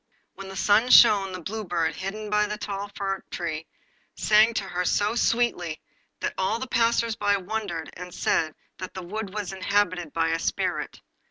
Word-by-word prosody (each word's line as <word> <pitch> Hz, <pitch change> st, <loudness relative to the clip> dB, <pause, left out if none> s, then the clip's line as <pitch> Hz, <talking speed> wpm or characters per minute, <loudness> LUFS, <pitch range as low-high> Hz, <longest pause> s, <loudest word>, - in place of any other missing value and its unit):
When 195 Hz, 0 st, -9 dB
the 195 Hz, -, -8 dB
sun 210 Hz, +5 st, +3 dB
shone 205 Hz, -6 st, +7 dB
the 185 Hz, -1 st, -6 dB
Blue 215 Hz, +5 st, -4 dB
Bird, 170 Hz, -4 st, 0 dB
hidden 210 Hz, +2 st, -5 dB
in 210 Hz, 0 st, +2 dB
the 210 Hz, -, -3 dB
tall 200 Hz, -1 st, -5 dB
fir 195 Hz, -1 st, -2 dB
tree, 160 Hz, -2 st, -4 dB, 0.5 s
sang 215 Hz, +2 st, +4 dB
to -, -, 0 dB
her 180 Hz, -1 st, -2 dB
so 205 Hz, +4 st, +1 dB
sweetly 230 Hz, -9 st, 0 dB, 0.4 s
that -, -, -1 dB
all 190 Hz, +4 st, +1 dB
the 260 Hz, -, -4 dB
passersby 230 Hz, -4 st, +2 dB
wondered, 190 Hz, -4 st, -4 dB
and 180 Hz, +1 st, -9 dB
said 160 Hz, -2 st, 0 dB, 0.2 s
that 185 Hz, +1 st, -7 dB
the 185 Hz, -, -5 dB
wood 205 Hz, +2 st, -5 dB
was 205 Hz, -2 st, -4 dB
inhabited 185 Hz, -4 st, 0 dB
by 165 Hz, 0 st, +1 dB
a 165 Hz, 0 st, 0 dB
spirit. -, -, -2 dB
195 Hz, 175 wpm, -26 LUFS, 180-215 Hz, 0.5 s, shone